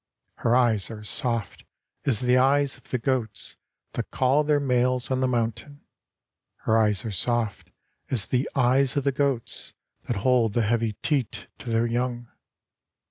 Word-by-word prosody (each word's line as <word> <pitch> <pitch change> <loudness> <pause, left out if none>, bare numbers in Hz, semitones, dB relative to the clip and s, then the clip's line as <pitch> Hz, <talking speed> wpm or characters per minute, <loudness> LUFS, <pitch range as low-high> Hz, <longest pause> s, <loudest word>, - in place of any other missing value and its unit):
Her 115 - +2
eyes 115 -6 +2
are 110 -2 -8
soft 115 0 -2 0.4
as 120 -7 +3
the 125 0 +3
eyes 135 +2 +3
of - - -19
the 130 - 0
goats 120 -3 -2 0.4
That - - -4
call 135 +3 +2
their 150 -1 +2
males 125 -1 +1
on 130 - +1
the 130 - +2
mountain, 125 +4 -2 0.8
Her 110 - +1
eyes 110 0 +2
are 110 - -3
soft 110 +2 -1 0.4
as 115 -6 +3
the 125 +2 0
eyes 130 +1 +3
of 140 - +1
the 140 - +2
goats 130 -3 -2 0.3
That 120 - -1
hold 120 -5 +3
the 120 - +2
heavy 115 0 0
teat 140 -7 -1
to 120 - -7
their 115 0 +2
young. 120 0 -2
125 Hz, 160 wpm, -25 LUFS, 115-130 Hz, 0.8 s, as